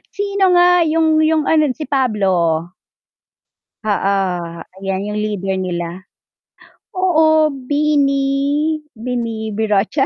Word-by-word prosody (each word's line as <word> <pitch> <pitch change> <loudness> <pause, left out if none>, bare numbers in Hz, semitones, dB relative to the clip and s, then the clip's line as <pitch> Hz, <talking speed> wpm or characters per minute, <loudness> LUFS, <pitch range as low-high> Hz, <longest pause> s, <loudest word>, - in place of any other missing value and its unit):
sino 400 -1 0
nga 355 0 +5
yung 320 0 +2
yung 315 -1 +2
ano 310 -1 +4
si 310 - -6
Pablo. 190 - +1 1.2
Oo, 200 -2 0 0.7
ayan 195 0 -3
yung 210 0 -3
leader 195 -3 -2
nila. 175 0 -5 0.9
Oo, 315 -4 +3
BINI, 275 0 0 0.7
BINI-birocha 220 0 -1
250 Hz, 90 wpm, -18 LUFS, 200-310 Hz, 1.2 s, nga